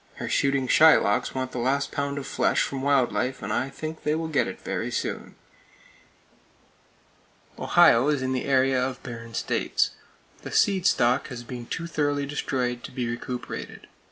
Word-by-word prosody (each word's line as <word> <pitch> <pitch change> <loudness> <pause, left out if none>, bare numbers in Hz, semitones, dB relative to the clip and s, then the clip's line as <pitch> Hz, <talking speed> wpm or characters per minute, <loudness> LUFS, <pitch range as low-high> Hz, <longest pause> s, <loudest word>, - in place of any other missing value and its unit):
Her - - -5
shooting 135 -1 +1
Shylocks 155 -10 +4
want 130 0 -2
the 125 - -4
last 140 +3 0
pound 140 0 -2
of 140 - -4
flesh - - +1
from 135 -1 -4
wild 135 -2 +2
life, 130 0 -2
and - - -2
I 130 - -1
think 155 +3 -7
they 150 +1 0
will 160 0 -2
get 150 - +1
it - - -7
very - - -3
soon. - - -4 2.2
Ohio 120 +4 +5
is 145 -3 +1
in 130 0 -1
the 130 - -2
area 130 -1 +2
of 130 0 -4
barren 115 -2 -8
states. - - 0 0.5
The - - -8
seed 195 -2 +3
stock 125 -3 +2
has 125 -3 -7
been 120 -1 -8
too 170 - -4
thoroughly 145 -3 -1
destroyed 125 -4 -2
to - - -9
be 125 -2 -3
recuperated. 120 +1 -6
130 Hz, 170 wpm, -25 LUFS, 125-145 Hz, 2.2 s, Ohio